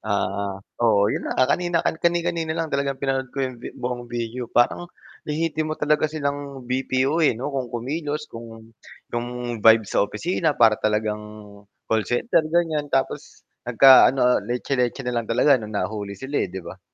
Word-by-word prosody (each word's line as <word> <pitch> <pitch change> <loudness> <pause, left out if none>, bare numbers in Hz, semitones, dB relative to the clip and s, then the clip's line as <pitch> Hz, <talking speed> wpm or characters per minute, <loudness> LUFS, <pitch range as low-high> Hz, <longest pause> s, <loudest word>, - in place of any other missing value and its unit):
Ah, 100 -1 -2 0.2
oo 105 -3 +3
'yon - - -2
na - - -3
nga 130 - +5
kanina, 175 -2 0
kani-kanina 170 -1 0
lang 165 -2 -3
talagang 140 -1 -1
pinanood 135 -1 -2
ko 135 +2 -2
'yong 130 -2 -6
vi - - -6
buong 120 -1 -4
video, 120 +1 -4
parang 170 +8 +1 0.4
lehitimo 155 0 -1
talaga 150 +1 +1
silang 140 -3 -4
BPO, 130 +4 0
eh, 145 -8 +3
'no 135 +4 -4
kung 130 -3 -3
kumilos, 145 +6 -4
kung 115 -3 -12 0.4
kung 120 -1 -4
vibe 110 0 +6
sa - - 0
opisina 160 - -1
para 110 -2 +4
talagang 105 0 0 0.6
call 110 -3 -1
center 125 - +2
ganiyan, 160 -3 0
tapos 135 -1 -3 0.2
nagka 130 +3 +8
ano, 130 0 +1
ah, 125 0 +3
letse-letse 125 +3 -2
na 125 - -2
lang 110 - -10
talaga 130 +3 +4
nung 110 -1 -6
nahuli 100 -1 -3
sila, 135 +6 -3
eh, - - -1
'di 95 -1 -8
ba? - - -10
130 Hz, 170 wpm, -23 LUFS, 115-150 Hz, 0.6 s, nagka